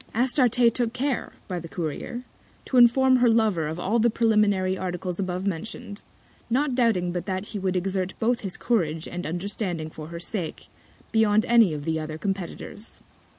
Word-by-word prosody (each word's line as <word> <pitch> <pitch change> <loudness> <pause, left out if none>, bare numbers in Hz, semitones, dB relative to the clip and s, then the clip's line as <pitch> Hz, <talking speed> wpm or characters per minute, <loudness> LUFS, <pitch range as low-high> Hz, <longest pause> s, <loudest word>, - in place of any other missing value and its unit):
Astarte 245 -1 +4
took 240 -2 0
care, 265 0 -2
by 180 -2 -3
the 170 - -8
Courier, 175 - -4 0.4
to 260 - 0
inform 255 +2 +6
her 245 -1 +4
Lover 215 -8 +2
of 160 +2 -4
all 210 +6 0
the 235 +2 +4
Preliminary 210 -5 +2
Articles 180 -1 -4
abovemention'd, 195 +3 -4 0.5
not 265 +3 +1
doubting 225 -8 +2
but 175 +2 -4
that 190 +1 -3
he 210 - -4
would 190 -1 -1
exert 185 0 -1
both 235 +2 +1
his 195 -3 -4
Courage 165 -9 0
and 175 -1 -5
Understanding 175 -2 -3
for 155 -1 -8
her 170 +1 -7
Sake, 175 -1 -4 0.4
beyond 220 -1 +3
any 230 -6 +5
of 150 -1 -5
the 160 -1 0
other 155 0 -5
Competitors. 195 +3 -5
200 Hz, 165 wpm, -25 LUFS, 175-230 Hz, 0.5 s, inform